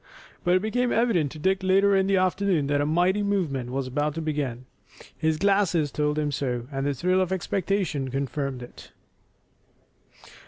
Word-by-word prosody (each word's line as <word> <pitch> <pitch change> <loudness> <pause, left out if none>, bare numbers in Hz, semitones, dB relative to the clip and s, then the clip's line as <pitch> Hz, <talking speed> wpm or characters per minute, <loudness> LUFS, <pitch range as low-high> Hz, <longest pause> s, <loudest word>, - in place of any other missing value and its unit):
But 175 +1 +3
it 185 - +1
became 245 +3 0
evident 200 - +2
to - - -9
Dick 190 +5 +1
later 195 +1 +3
in 190 0 +2
the 195 -1 +3
afternoon 185 -3 +1
that 145 0 +1
a 145 - 0
mighty 180 +6 +2
movement 170 -12 -1
was 135 +1 -2
about 145 +3 -1
to - - -3
begin. 140 -5 -3 0.5
His 160 0 0
glasses 185 -6 +2
told 150 0 -1
him 150 -1 0
so, 125 -3 -2
and 135 0 -2
the 145 - 0
thrill 185 +7 +1
of 185 -1 -1
expectation 190 -6 -1
confirmed 135 0 -3
it. 120 - -13
160 Hz, 170 wpm, -25 LUFS, 140-190 Hz, 0.5 s, But